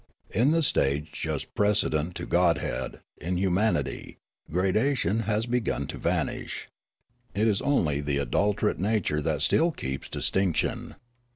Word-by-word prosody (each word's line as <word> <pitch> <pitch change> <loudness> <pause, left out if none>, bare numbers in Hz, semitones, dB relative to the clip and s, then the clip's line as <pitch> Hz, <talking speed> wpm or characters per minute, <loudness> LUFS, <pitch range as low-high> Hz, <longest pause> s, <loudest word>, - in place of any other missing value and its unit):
In 120 +7 +3
the 165 +1 +3
stage 75 - +1
just - - -4
precedent 90 -5 +1
to 85 - -4
godhead, 85 -8 0 0.2
in 90 +3 -2
humanity, 95 +4 0 0.3
gradation 100 - +1
has 105 +1 +1
begun 120 -1 -1
to - - -7
vanish. - - -2 0.7
It 105 +3 +2
is 105 -3 +2
only 75 - +1
the 70 -1 -1
adulterate 100 - +1
nature 95 -7 +1
that - - 0
still 165 +2 +4
keeps 65 - -5
distinction. 95 -4 -1
95 Hz, 125 wpm, -27 LUFS, 75-110 Hz, 0.7 s, still